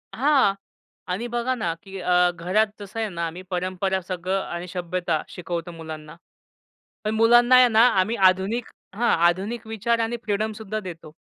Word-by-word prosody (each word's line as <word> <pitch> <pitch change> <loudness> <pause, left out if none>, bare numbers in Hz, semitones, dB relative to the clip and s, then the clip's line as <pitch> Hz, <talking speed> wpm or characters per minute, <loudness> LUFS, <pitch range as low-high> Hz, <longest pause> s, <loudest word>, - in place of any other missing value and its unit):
हां 270 -5 +3 0.6
आणि 215 +7 -2
बघा 240 +1 -1
ना, 175 -9 -2
की 195 -1 -9
अ, 180 0 +3
घरात 185 +6 +1
जसं 205 +2 -7
आहे 220 -1 -1
ना 170 -2 -3
मी 180 - -9
परंपरा 185 +1 -1
सगळं 185 +1 -2
आणि 175 +1 -6
सभ्यता 175 -2 -2
शिकवतो 175 -1 -5
मुलांना. 160 -2 -9 0.9
पण 215 +1 -1
मुलांना 240 +3 +6
आहे 255 0 +8
ना, 225 +1 +5
आम्ही 210 +5 +1
आधुनिक 195 +6 -2 0.3
हां, 235 +3 +1 0.2
आधुनिक 205 +6 -2
विचार 225 +2 0
आणि 230 +1 -1
फ्रीडम 215 +1 -1
सुद्धा 215 0 -5
देतो. 170 -6 -9
195 Hz, 160 wpm, -24 LUFS, 180-225 Hz, 0.9 s, आहे